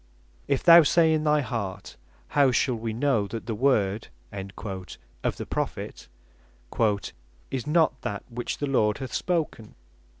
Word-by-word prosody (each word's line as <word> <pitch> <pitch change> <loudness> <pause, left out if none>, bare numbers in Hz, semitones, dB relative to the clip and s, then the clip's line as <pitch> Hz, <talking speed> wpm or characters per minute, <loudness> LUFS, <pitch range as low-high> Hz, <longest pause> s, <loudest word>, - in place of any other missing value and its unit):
"If 140 -2 0
thou 170 0 +10
say 160 +1 +4
in 155 0 0
thy 150 0 +3
heart, 100 -7 -5 0.3
How 140 -2 +4
shall 125 +1 +2
we 115 -1 -3
know 115 -3 +1
that 115 +2 -6
the 115 - -3
Word 110 -4 +1 0.3
(of 95 - -6
the - - -5
Prophet) - - -4 1.4
is 130 0 -3
not 155 -4 +2
that 100 -1 -4
which 120 0 -4
the 145 - -2
Lord 110 -6 +2
hath 130 -3 -7
spoken. 160 -11 -2
125 Hz, 140 wpm, -26 LUFS, 105-145 Hz, 1.4 s, thou